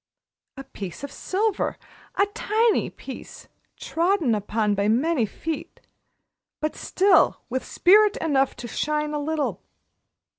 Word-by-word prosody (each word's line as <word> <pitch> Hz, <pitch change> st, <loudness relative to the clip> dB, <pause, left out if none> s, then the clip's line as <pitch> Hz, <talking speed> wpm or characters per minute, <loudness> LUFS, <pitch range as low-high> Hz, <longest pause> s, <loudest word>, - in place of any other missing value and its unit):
A 270 Hz, -, -6 dB
piece 200 Hz, -6 st, -8 dB
of 280 Hz, -, -5 dB
silver 405 Hz, +5 st, -1 dB, 0.4 s
a 400 Hz, -, +4 dB
tiny 450 Hz, 0 st, +1 dB
piece -, -, -10 dB, 0.3 s
trodden 335 Hz, -, +1 dB
upon 210 Hz, 0 st, 0 dB
by 200 Hz, 0 st, 0 dB
many 250 Hz, +2 st, +2 dB
feet, 320 Hz, +8 st, -6 dB, 0.8 s
but 305 Hz, 0 st, -2 dB
still 385 Hz, +1 st, +3 dB
with 260 Hz, +1 st, -1 dB
spirit 415 Hz, +3 st, +4 dB
enough 275 Hz, -4 st, +1 dB
to 240 Hz, 0 st, -7 dB
shine 300 Hz, +4 st, -1 dB
a 295 Hz, -, -1 dB
little. 305 Hz, 0 st, -2 dB
300 Hz, 120 wpm, -24 LUFS, 245-370 Hz, 0.8 s, a